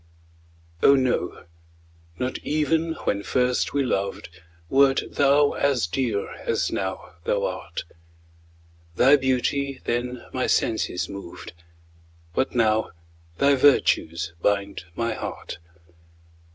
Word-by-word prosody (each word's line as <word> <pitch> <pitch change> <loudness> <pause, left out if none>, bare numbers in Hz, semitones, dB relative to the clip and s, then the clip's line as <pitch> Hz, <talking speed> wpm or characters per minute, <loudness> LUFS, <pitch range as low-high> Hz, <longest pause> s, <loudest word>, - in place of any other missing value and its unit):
Oh, 140 - +7
no 130 -8 0 0.7
not 125 +1 -2
even 160 +2 0
when 100 - 0
first 125 +3 0
we 140 -1 +1
loved, 100 -5 -2 0.4
Wert 135 +4 +4
thou 145 +1 +4
as 135 -7 +1
dear 105 +2 -2
as - - -1
now - - -4
thou - - +1
art; - - -5 1.1
Thy 135 +9 +6
beauty 135 +1 0
then 120 +1 -2
my 130 - 0
senses 110 -5 0
moved, 100 -5 -9 0.8
But 130 +6 -1
now 110 -2 +2 0.5
thy 140 +6 +4
virtues 90 - +3
bind 100 -2 0
my 115 -1 -1
heart. - - -6
125 Hz, 105 wpm, -24 LUFS, 100-140 Hz, 1.1 s, Oh